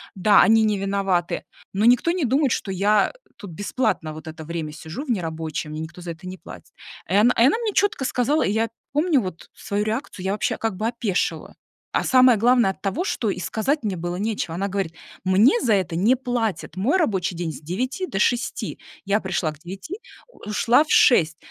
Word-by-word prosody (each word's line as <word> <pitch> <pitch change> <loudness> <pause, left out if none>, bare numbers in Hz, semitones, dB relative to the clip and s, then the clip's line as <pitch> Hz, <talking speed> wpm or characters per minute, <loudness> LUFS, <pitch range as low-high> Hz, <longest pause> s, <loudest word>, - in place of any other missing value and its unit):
Да, 205 +2 +5
они 225 0 +5
не 210 -1 +1
виноваты, 195 -3 -1 0.3
но 200 - 0
никто 245 +7 +4
не 350 -3 -1
думает, 270 +1 +2
что 195 - -3
я, 200 +2 +3
э, - - -23 0.2
тут 200 - -9
бесплатно 185 -3 -2
вот 155 +1 -10
это 160 0 -9
время 160 -2 -4
сижу 160 - -7
в 300 - -12
нерабочее, 160 -5 -3
мне 155 +1 -5
никто 170 +3 -8
за 175 -1 -5
это 165 +2 -11
не 185 +1 -7
платит. 165 - -13 0.4
И 185 - -1
она 220 +5 +5
и - - +3
она 295 - +2
мне 455 -3 -2
чётко 405 -9 +1
сказала, 260 +5 +1
и - - 0
я 225 +2 0 0.2
помню 300 0 +3
вот 185 -6 -6
свою 205 +1 -3
реакцию, 215 -3 -4
я 190 - 0
вообще 210 - -1
как 220 -5 -2
бы 220 - -1
опешила. 230 -5 -2 0.4
А - - 0
самое 255 -3 +5
главное- 235 -2 +4
от - - -15
того, 270 - -2
что 230 - -1
и 190 - -3
сказать 220 - -1
мне 200 -4 -1
было 175 +1 -4
нечего. 205 -5 -2
Она 195 +3 -1
говорит: 195 -4 -3 0.3
"Мне 200 +7 +4
за 230 -4 +2
это 185 -4 0
не 215 +9 +3
платят, 240 -8 -2
мой 230 - +1
рабочий 195 - 0
день 165 -2 -3
с 140 - -10
9 255 - -3
до 195 - -4
6, 240 +3 -1 0.3
я 200 +2 +1
пришла 175 -4 -2
к 150 - -19
9, 195 - -8 0.3
ушла 235 - +1
в - - -17
6. 160 - +5
205 Hz, 210 wpm, -23 LUFS, 180-245 Hz, 0.4 s, Да